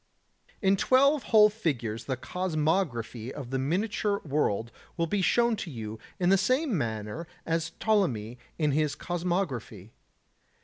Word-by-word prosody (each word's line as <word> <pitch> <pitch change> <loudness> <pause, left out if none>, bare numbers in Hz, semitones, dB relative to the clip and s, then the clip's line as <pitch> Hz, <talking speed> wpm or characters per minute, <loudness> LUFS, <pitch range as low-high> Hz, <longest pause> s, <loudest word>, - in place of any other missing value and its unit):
77. - - +1
In 195 +1 +5
twelve 275 +6 +4
whole 215 -2 +7
figures 125 - -2
the 130 -2 -2
cosmography 155 - -1
of 135 -3 -7
the 135 - 0
miniature 200 +7 0
world 120 -6 0 0.3
will 170 - +1
be 195 +4 0
shown 235 +4 +3
to 185 - -5
you 110 -5 -6 0.2
in 175 -1 +2
the 195 0 +5
same 255 - +1
manner 110 +3 -3 0.2
as 165 0 -1
Ptolemy 125 - +1 0.2
in 150 -3 +2
his 150 +1 +1
cosmography. 165 - -3
165 Hz, 140 wpm, -28 LUFS, 120-195 Hz, 0.3 s, whole